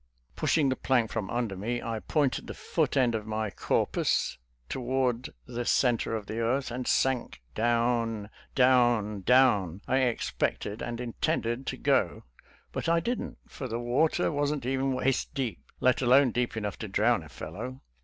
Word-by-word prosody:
Pushing 150 -4 +2
the 130 - +1
plank 120 -5 +1
from 100 -3 -3
under 120 -4 -1
me, 115 +6 -2
I 115 -2 -3
pointed 145 +2 0
the - - -6
foot - - -1
end 125 -3 +3
of 110 -1 -3
my 110 -1 -2
corpus 70 - 0 0.3
toward 125 - -1 0.2
the 120 -1 -4
center 120 -2 +2
of 110 -2 -4
the 110 +3 -4
earth, 125 +3 0
and 125 +1 -4
sank. 130 - +1
Down, 115 -2 0 0.2
down, 120 -6 +3
down, 105 -6 +4
I 130 - +2
expected 115 -3 -1
and 120 -1 -4
intended 120 +1 -1
to - - -2
go, - - +1 0.5
but - - -2
I 170 0 +4
didn't, 235 +9 -3
for 130 - -6
the 115 -1 -3
water 130 +10 +1
wasn't 145 -2 -1
even 135 +1 0
waist 130 0 0
deep, 130 -4 -2 0.2
let 130 0 +3
alone 130 +1 +5
deep 120 0 -1
enough 105 -3 -3
to - - -4
drown - - +2
a - - -12
fellow. 125 - -7
120 Hz, 165 wpm, -29 LUFS, 115-130 Hz, 0.5 s, alone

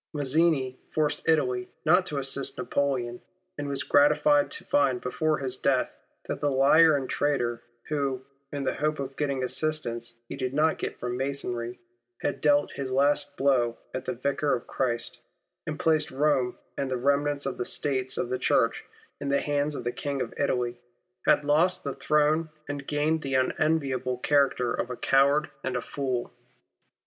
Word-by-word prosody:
Mazzini 145 -2 +1
forced 155 +1 -1
Italy 125 -6 +1 0.2
not 180 +4 +4
to 150 - -3
assist 135 0 -1
Napoleon, 125 -4 -1 0.3
and 145 -1 -4
was 140 - -1
gratified 145 0 +4
to - - -6
find 135 -3 +2
before 155 +5 0
his 130 -2 -3
death, 130 -2 +1 0.3
that - - -3
the 145 - +2
liar 145 +4 +5
and 135 -2 -2
traitor, 120 -5 0 0.2
who, 140 -3 -2 0.3
in 145 -1 -3
the - - 0
hope 155 +1 -1
of 135 -1 -5
getting 140 -3 -1
assistance 120 -5 -1
he - - -6
did 130 +1 -3
not 155 +1 +2
get - - -4
from 125 0 -3
Masonry, 125 -3 -3 0.4
had - - -1
dealt 145 -1 +3
his 135 -2 -5
last 145 +1 +2
blow 125 -4 +2 0.2
at 130 - -4
the 130 - -2
Vicar 140 +3 0
of 120 - -6
Christ, 120 -3 -2 0.5
and 155 0 -4
placed 160 -4 +2
Rome 135 -2 +1 0.2
and 135 - -2
the 130 - -1
remnant 140 +2 +1
of - - -3
the - - +1
States 130 -1 -2
of 120 - -1
the 130 - -2
Church - - +2 0.4
in 140 - -4
the 140 - +3
hands 145 0 0
of 125 - -5
the 120 - -1
King 140 +2 -3
of - - -3
Italy, 125 -4 -1 0.5
had 145 - +4
lost 160 +5 +3
the 140 - -3
throne 150 +3 +2 0.2
and 140 -1 -5
gained 155 +2 +1
the 135 -2 -2
unenviable 130 -2 +1
character 135 -3 +2
of 120 - -2
a 125 - -5
coward 140 +2 +3
and 130 -1 -2
a - - +1
fool. 130 -2 -3
140 Hz, 175 wpm, -27 LUFS, 130-150 Hz, 0.5 s, liar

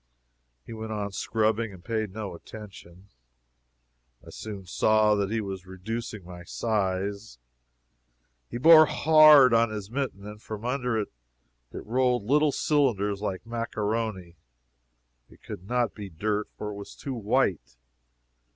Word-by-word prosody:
He 115 - -9
went 110 0 -6
on 105 -1 -3
scrubbing, 110 +2 0
and 90 -3 -14
paid 110 -3 -2
no 105 -1 -6
attention. 95 -1 -12 1.2
I - - -11
soon 100 -3 -8
saw 110 +4 +3
that 100 -2 0
he 110 +1 -1
was 95 -2 -6
reducing 105 +2 -6
my 90 0 -10
size. 100 - -2 1.1
He 120 - -5
bore 155 +3 +8
hard 155 -4 +7
on 115 0 +4
his 105 -1 -6
mitten, 125 -7 -3
and 105 0 -9
from 110 0 -7
under 125 -2 -1
it 105 - -2 0.6
rolled 125 0 0
little 145 +6 +3
cylinders, 105 -11 +1
like 95 -2 -4
maccaroni. 110 -5 -3 0.9
It - - -20
could 90 - -9
not 120 -3 0
be 105 -2 -8
dirt, 105 +5 -2
for 105 - -5
it 100 - -8
was 100 - -10
too 135 - -6
white. 105 - -1
110 Hz, 135 wpm, -27 LUFS, 100-115 Hz, 1.2 s, bore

